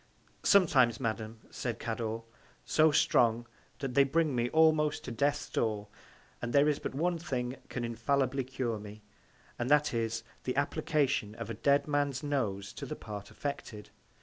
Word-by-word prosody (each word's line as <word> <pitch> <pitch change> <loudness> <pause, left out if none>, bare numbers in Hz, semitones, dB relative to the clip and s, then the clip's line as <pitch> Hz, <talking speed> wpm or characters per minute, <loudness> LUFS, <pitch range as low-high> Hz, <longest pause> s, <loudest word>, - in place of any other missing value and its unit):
Sometimes, 130 - +4
Madam, 110 -2 -3
said 120 -3 -3
Cador, 115 0 -3 0.4
so 155 0 +4
strong, 120 -4 +3 0.3
that 135 -3 -4
they 140 - +6
bring 150 0 +1
me 120 0 +1
almost 155 -1 +3
to 125 - -6
Death's 140 +5 0
Door; 105 -2 -1 0.5
and 120 - -3
there 145 +1 +5
is 150 -2 +1
but - - -5
one 170 +3 0
Thing 130 -6 -3
can 125 - -3
infallibly 130 +3 0
cure 125 -3 -3
me; 105 0 -10 0.6
and 120 +1 -1
that 150 -1 +4
is, 115 -1 -1 0.2
the 125 - -2
Application 140 -6 0
of 115 - -6
a - - -2
dead 140 +6 +2
Man's 145 -1 0
Nose 105 -9 -2
to - - -7
the - - -4
part 105 -1 -8
affected. 115 -7 -6
125 Hz, 160 wpm, -31 LUFS, 115-145 Hz, 0.6 s, they